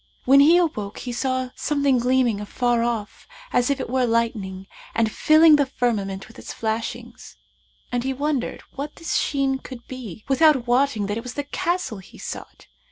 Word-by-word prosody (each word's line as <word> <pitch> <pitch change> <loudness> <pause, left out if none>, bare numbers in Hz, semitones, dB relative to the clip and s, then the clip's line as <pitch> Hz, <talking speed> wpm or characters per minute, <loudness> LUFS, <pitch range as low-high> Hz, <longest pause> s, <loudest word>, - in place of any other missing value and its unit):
When 275 +2 +7
he 315 +5 +7
awoke, 220 - -1
he 245 - -5
saw 260 +1 0
a 255 - -10
something 280 -3 +1
gleaming 245 -3 +2
afar 240 +3 0
off 230 -3 -3 0.3
as 245 +2 +2
it 275 -2 -1
were 255 +1 +1
lightning 215 -5 -1 0.3
and 225 -1 +2
filling 310 +3 +6
the 285 - +3
firmament 210 -7 -2
with 220 - -14
its - - -8
flashings; 225 0 -5 0.5
and 245 -1 -1
he 265 - -1
wondered 280 -1 -2
what 285 +2 -6
this 330 - -4
sheen 270 -2 +1
could 255 -3 -10
be 230 -7 -8
without 275 -2 +4
wotting 245 -3 +2
that 205 +2 -2
it 230 - -5
was 250 0 -7
the 285 - -2
Castle 335 - -2
he 190 - -15
sought. - - -8
250 Hz, 175 wpm, -23 LUFS, 225-280 Hz, 0.5 s, When